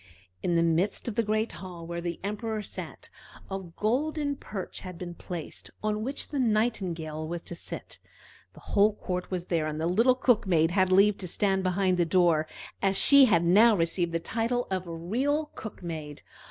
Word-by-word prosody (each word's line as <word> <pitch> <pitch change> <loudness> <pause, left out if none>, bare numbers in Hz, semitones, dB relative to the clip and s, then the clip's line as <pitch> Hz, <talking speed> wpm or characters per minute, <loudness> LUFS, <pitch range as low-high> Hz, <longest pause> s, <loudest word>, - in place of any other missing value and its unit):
In 175 - 0
the 165 - +4
midst 170 +7 0
of 235 - -2
the 230 - +2
great 215 +1 0
hall, 175 -3 -9
where 170 +1 -4
the 170 -1 -4
Emperor 215 +1 -3
sat, - - -7 0.4
a 195 - -2
golden 280 - -1
perch 195 -8 -6
had 180 -2 -8
been 175 -1 -6
placed, 170 -2 -7
on 215 0 0
which 270 +4 -2
the 290 - -2
Nightingale 185 -10 0
was 170 +1 -5
to - - -5
sit. 170 - -7 0.5
The - - -15
whole 205 +1 +5
court 180 -2 -4
was 180 -2 -3
there, 165 -4 0
and 155 0 -4
the 160 - -1
little 230 +9 +4
Cook 245 -5 +2
maid 165 -2 +3
had 185 0 +2
leave 200 +2 +5
to 185 - -4
stand 190 +2 +1
behind 185 0 +1
the 175 - +3
door, 165 -3 +3 0.3
as 195 -1 +2
she 280 -1 +7
had 175 -8 +3
now 215 +6 +6
received 170 +1 0
the 165 - 0
title 230 +7 -1
of 185 -1 -2
a - - -6
real 265 - -1
cook 220 -4 -8
maid. 155 -4 -6
190 Hz, 195 wpm, -28 LUFS, 170-220 Hz, 0.5 s, she